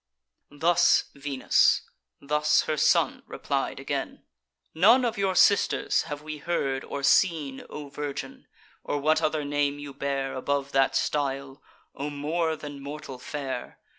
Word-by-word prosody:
Thus 170 Hz, +4 st, +3 dB
Venus: 140 Hz, -1 st, +2 dB, 0.4 s
thus 150 Hz, +1 st, +2 dB
her 155 Hz, -, -1 dB
son 150 Hz, -, +2 dB
replied -, -, -3 dB
again: -, -, -4 dB, 0.5 s
"None 225 Hz, +10 st, +5 dB
of 235 Hz, -1 st, -1 dB
your 190 Hz, -1 st, +1 dB
sisters 200 Hz, +2 st, +3 dB
have 145 Hz, 0 st, -5 dB
we 155 Hz, -1 st, -6 dB
heard 140 Hz, -5 st, -1 dB
or 140 Hz, -, -6 dB
seen, 150 Hz, -5 st, +2 dB
O 150 Hz, -1 st, -7 dB
virgin! 140 Hz, 0 st, -6 dB, 0.4 s
or 145 Hz, -, -2 dB
what 155 Hz, +2 st, +2 dB
other 155 Hz, -2 st, 0 dB
name 145 Hz, 0 st, 0 dB
you 145 Hz, -1 st, -8 dB
bear 135 Hz, -1 st, -2 dB
Above 140 Hz, +1 st, -2 dB
that 135 Hz, 0 st, +2 dB
style; 135 Hz, -1 st, -1 dB, 0.3 s
O 140 Hz, +2 st, -4 dB
more 160 Hz, +3 st, -1 dB
than 145 Hz, -2 st, -9 dB
mortal 140 Hz, -2 st, -8 dB
fair! 135 Hz, -3 st, -5 dB
145 Hz, 135 wpm, -27 LUFS, 140-155 Hz, 0.5 s, None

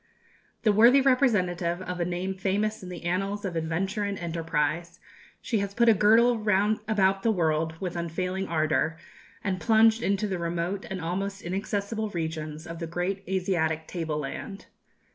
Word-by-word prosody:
The 215 Hz, -, +5 dB
worthy 235 Hz, +6 st, +7 dB
representative 185 Hz, -11 st, +2 dB
of 180 Hz, -1 st, -5 dB
a 170 Hz, -, +1 dB
name 180 Hz, +2 st, -2 dB
famous 200 Hz, +3 st, -1 dB
in 185 Hz, -, -8 dB
the 175 Hz, -2 st, -8 dB
annals 195 Hz, +4 st, -1 dB
of 180 Hz, -3 st, -3 dB
adventure 180 Hz, +6 st, -1 dB
and 200 Hz, -1 st, -2 dB
enterprise, 165 Hz, -1 st, -2 dB, 0.4 s
she 225 Hz, -, 0 dB
has 200 Hz, 0 st, -3 dB
put 235 Hz, 0 st, +5 dB
a -, -, +8 dB
girdle 225 Hz, +4 st, +4 dB
round 210 Hz, 0 st, +2 dB
about 195 Hz, -3 st, +2 dB
the 230 Hz, -, +1 dB
world 160 Hz, -3 st, 0 dB
with 180 Hz, -2 st, -4 dB
unfailing 180 Hz, +3 st, -2 dB
ardour, 155 Hz, 0 st, +1 dB, 0.5 s
and 185 Hz, -3 st, -2 dB
plunged 225 Hz, 0 st, +4 dB
into 200 Hz, 0 st, 0 dB
the 190 Hz, -3 st, -3 dB
remote 170 Hz, +3 st, -2 dB
and 190 Hz, -, -4 dB
almost 195 Hz, +4 st, -3 dB
inaccessible 205 Hz, +4 st, -2 dB
regions 160 Hz, -3 st, -4 dB
of 165 Hz, -1 st, -7 dB
the 165 Hz, -, -4 dB
great 180 Hz, +4 st, -2 dB
Asiatic 170 Hz, -4 st, 0 dB
table 160 Hz, -3 st, -3 dB
land. 195 Hz, +7 st, -6 dB
185 Hz, 160 wpm, -27 LUFS, 170-205 Hz, 0.5 s, a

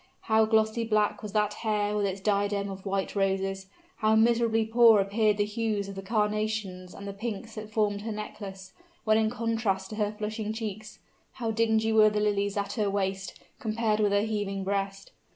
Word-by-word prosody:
How 220 Hz, -1 st, +3 dB
glossy 220 Hz, +1 st, +2 dB
black 215 Hz, -2 st, +1 dB
was 210 Hz, -2 st, -6 dB
that 210 Hz, -1 st, +1 dB
hair 210 Hz, -2 st, -1 dB
with 205 Hz, -1 st, +1 dB
its 195 Hz, 0 st, -3 dB
diadem 200 Hz, 0 st, 0 dB
of 195 Hz, +1 st, -8 dB
white 195 Hz, +1 st, -2 dB
roses! 195 Hz, -1 st, 0 dB, 0.3 s
How 215 Hz, 0 st, +3 dB
miserably 225 Hz, 0 st, +3 dB
poor 225 Hz, -1 st, +6 dB
appeared 205 Hz, +2 st, +2 dB
the 205 Hz, -, +2 dB
hues 210 Hz, -2 st, -2 dB
of 200 Hz, -, -6 dB
the 195 Hz, -, -6 dB
carnations 210 Hz, -3 st, -2 dB
and 200 Hz, -, -8 dB
the 200 Hz, -, -5 dB
pinks 220 Hz, +1 st, -5 dB
that 215 Hz, -1 st, -7 dB
formed 210 Hz, -2 st, 0 dB
her 220 Hz, +1 st, -4 dB
necklace, 195 Hz, -2 st, -7 dB, 0.3 s
when 215 Hz, 0 st, +4 dB
in 220 Hz, 0 st, +2 dB
contrast 225 Hz, -5 st, -1 dB
with 215 Hz, -, -6 dB
her 210 Hz, -1 st, +1 dB
flushing 215 Hz, 0 st, -3 dB
cheeks! 215 Hz, -1 st, -6 dB, 0.4 s
How 230 Hz, -3 st, -2 dB
dingy 220 Hz, 0 st, +2 dB
were 215 Hz, -1 st, +7 dB
the 210 Hz, 0 st, -1 dB
lilies 205 Hz, -1 st, 0 dB
at 200 Hz, 0 st, -2 dB
her 210 Hz, -3 st, 0 dB
waist, 195 Hz, -1 st, -2 dB, 0.2 s
compared 220 Hz, -1 st, 0 dB
with 205 Hz, -1 st, +2 dB
her 200 Hz, 0 st, +3 dB
heaving 205 Hz, -3 st, -2 dB
breast! 195 Hz, 0 st, -3 dB
210 Hz, 190 wpm, -28 LUFS, 200-220 Hz, 0.4 s, were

